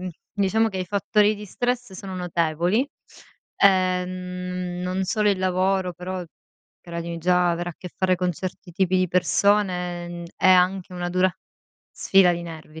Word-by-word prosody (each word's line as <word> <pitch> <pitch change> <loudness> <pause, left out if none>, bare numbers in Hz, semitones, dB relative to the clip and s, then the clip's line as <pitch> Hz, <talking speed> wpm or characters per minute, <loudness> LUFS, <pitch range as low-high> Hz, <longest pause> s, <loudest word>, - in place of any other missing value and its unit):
mhmm, 185 - -4 0.3
diciamo, 215 +3 +2
che 190 -3 -5
i 185 - -1
fattori 205 +2 +2
di 210 0 -9
stress 245 +1 -2
sono 190 0 -7
notevoli. 175 - 0 0.7
Ehm, 180 -1 0
non 185 +1 -1
solo 210 +2 +2
il 195 - 0
lavoro, 185 0 +1
però, 180 0 -5 0.6
credimi, 170 0 -5
già 180 +1 +3
avere 175 +1 -2
a - - -13
che 180 - -9
fare 185 -1 +2
con 180 0 0
certi 180 +2 -7
tipi 185 +1 +1
di 185 0 +2
persone, 180 -1 +1
mhmm, 175 0 -7
è - - +3
anche 185 0 +3
una 175 -1 -3
dura 185 +1 +2 0.6
sfida 190 -2 +4
di 170 0 -4
nervi. 160 -1 -10
185 Hz, 160 wpm, -24 LUFS, 175-190 Hz, 0.7 s, sfida